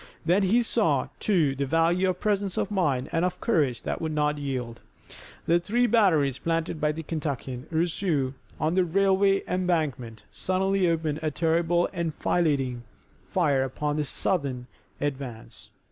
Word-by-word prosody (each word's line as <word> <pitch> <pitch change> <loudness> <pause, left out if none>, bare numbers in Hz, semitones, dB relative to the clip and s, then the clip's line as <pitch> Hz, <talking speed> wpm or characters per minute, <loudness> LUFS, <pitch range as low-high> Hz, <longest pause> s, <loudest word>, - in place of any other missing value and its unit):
Then 180 +5 +3
he 220 +6 +3
saw, 165 - +1
too, 165 -10 +2
the 140 +1 -2
value 165 +5 +2
of 180 -1 -2
presence 205 -2 -1
of 200 - -1
mind 145 -10 0
and 165 0 +1
of 180 0 0
a - - -30
courage 145 - +1
that - - -3
would 160 -1 -2
not 150 -1 0
yield. 125 -5 -4 0.6
The 170 +1 +3
three 230 +8 +1
batteries 170 - +3
planted 165 -1 -2
by 150 0 +2
the 160 +2 -6
Kentuckian, 140 -4 -4
Rousseau, 160 -4 0 0.3
on 155 +1 +1
the 185 0 +3
railway 195 +2 +2
embankment 155 -12 -1
suddenly 190 0 +1
opened 160 -2 -1
a 155 - 0
terrible 170 +2 +1
enfilading 150 -6 0 0.5
fire 145 -7 +2
upon 145 +3 -2
the 150 - +1
Southern 140 -6 -2 0.3
advance. 135 -5 -5
160 Hz, 150 wpm, -26 LUFS, 140-185 Hz, 0.6 s, Then